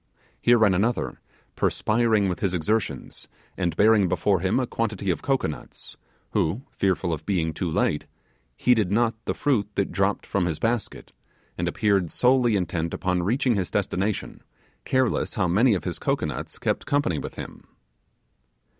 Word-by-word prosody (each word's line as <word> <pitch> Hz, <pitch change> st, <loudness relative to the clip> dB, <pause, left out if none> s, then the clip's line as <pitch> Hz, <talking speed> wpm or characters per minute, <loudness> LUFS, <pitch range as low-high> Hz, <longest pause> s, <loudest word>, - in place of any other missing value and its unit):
Here 120 Hz, 0 st, +5 dB
ran 110 Hz, -4 st, +4 dB
another, 110 Hz, +6 st, -1 dB, 0.3 s
perspiring 110 Hz, -2 st, +2 dB
with 90 Hz, -, -2 dB
his 95 Hz, -3 st, 0 dB
exertions, 105 Hz, +6 st, -2 dB, 0.3 s
and 85 Hz, -3 st, -1 dB
bearing 105 Hz, -1 st, +5 dB
before 95 Hz, +2 st, +2 dB
him 95 Hz, +7 st, +1 dB
a 130 Hz, -, 0 dB
quantity 105 Hz, -5 st, -1 dB
of 85 Hz, -, -3 dB
cocoanuts, 130 Hz, -, -3 dB, 0.4 s
who, 100 Hz, +12 st, 0 dB
fearful 95 Hz, -3 st, 0 dB
of 75 Hz, -, -5 dB
being 85 Hz, -5 st, 0 dB
too 85 Hz, +3 st, -2 dB
late, 80 Hz, -, 0 dB, 0.5 s
heeded 110 Hz, -7 st, +3 dB
not 115 Hz, +2 st, +2 dB
the -, -, -1 dB
fruit 120 Hz, -9 st, +1 dB
that 100 Hz, -, 0 dB
dropped 100 Hz, 0 st, 0 dB
from 95 Hz, -3 st, 0 dB
his 80 Hz, -3 st, -2 dB
basket, 115 Hz, -1 st, -2 dB, 0.4 s
and 85 Hz, -, -2 dB
appeared 95 Hz, -1 st, +1 dB
solely 125 Hz, 0 st, +3 dB
intent 85 Hz, -3 st, -1 dB
upon 90 Hz, -1 st, 0 dB
reaching 125 Hz, +7 st, +1 dB
his 95 Hz, -4 st, -1 dB
destination, 100 Hz, +3 st, -2 dB, 0.4 s
careless 130 Hz, -3 st, +1 dB
how 95 Hz, -3 st, +1 dB
many 105 Hz, +6 st, +4 dB
of 90 Hz, -, -3 dB
his -, -, -4 dB
cocoanuts -, -, -2 dB
kept -, -, -2 dB
company 140 Hz, -, +1 dB
with -, -, -7 dB
him. -, -, -9 dB
100 Hz, 155 wpm, -25 LUFS, 90-115 Hz, 0.5 s, Here